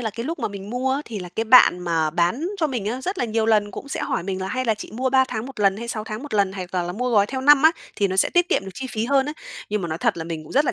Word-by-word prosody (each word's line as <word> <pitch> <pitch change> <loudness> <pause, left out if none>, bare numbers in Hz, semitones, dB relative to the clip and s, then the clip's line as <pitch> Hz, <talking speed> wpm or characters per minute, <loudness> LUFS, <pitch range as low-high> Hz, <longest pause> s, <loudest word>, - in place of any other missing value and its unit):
là 225 -3 -2
cái 230 +3 -6
lúc 330 +4 -4
mà - - -2
mình 200 0 -8
mua 255 +2 0
á, 275 - -1
thì 220 -3 -6
là 180 -1 -7
cái 225 - 0
bạn 225 -6 +7
mà 165 -3 0
bán 175 - 0
cho 320 -4 +1
mình 240 -7 -4
á, 245 +4 -2
rất 370 +7 -3
là - - +1
nhiều 225 -1 0
lần 210 -2 +2
cũng 280 - -8
sẽ - - -3
hỏi - - -2
mình 190 0 -4
là 190 - -3
"Hay 255 0 -2
là 225 -3 +2
chị 210 - -9
mua 255 +3 -1
3 265 0 +5
tháng 220 +2 -4
một 265 -5 -9
lần, 195 -1 +3
hay 235 +2 -7
6 215 -2 -3
tháng 215 +3 -6
một 290 -7 -6
lần, 200 -2 +2
hoặc 185 -1 -7
là 180 - +1
là 175 +1 -4
mua 250 +5 -2
gói 205 -3 +4
theo 260 +3 -4
năm 290 +1 +6
á, 315 - +8 0.3
thì 200 - +1
nó 190 - -2
sẽ - - +3
tiết 350 0 +2
kiệm - - +1
được 190 - -7
chi 265 - -5
phí 220 -1 -2
hơn 275 +1 +2
á." 295 - -3 0.4
Nhưng 210 -1 -1
mà 170 - -3
nói 160 +1 -3
thật - - +1
là 165 - -5
mình 160 -2 -6
rất 285 +3 +3
là - - 0
220 Hz, 360 wpm, -23 LUFS, 190-260 Hz, 0.4 s, á